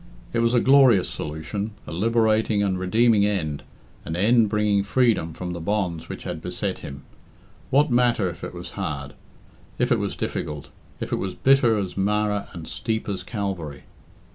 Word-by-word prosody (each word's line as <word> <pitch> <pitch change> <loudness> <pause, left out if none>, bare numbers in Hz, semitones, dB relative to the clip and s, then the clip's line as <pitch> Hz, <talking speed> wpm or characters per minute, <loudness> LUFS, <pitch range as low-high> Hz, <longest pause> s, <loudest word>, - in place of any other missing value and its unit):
It 115 - +1
was 115 +1 +2
a - - +6
glorious 130 -7 +5
solution, 90 +8 -5
a - - -8
liberating 110 +2 +2
and 95 -2 0
redeeming 110 +3 +3
end, 85 -8 -1 0.4
an 80 - -4
end 110 +4 +4
bringing 105 -1 +2
freedom 105 -5 +2
from 90 +2 -5
the 85 - -6
bonds 85 -3 -2
which - - -7
had 85 -3 -5
beset 90 +2 -3
him. 70 0 -9 0.7
What 145 +1 +3
matter 120 -5 +3
if 85 - -7
it - - -6
was - - -7
hard; 70 -2 -4 0.6
if - - +1
it - - +4
was - - -2
difficult; 75 -1 -4 0.3
if - - -5
it - - +1
was 95 -2 -4
bitter 130 -5 +4
as 95 -3 -3
Marah 105 +1 0
and 85 -3 -8
steep 110 -1 -3
as 100 -2 -3
Calvary? 95 - -4
100 Hz, 170 wpm, -24 LUFS, 85-115 Hz, 0.7 s, a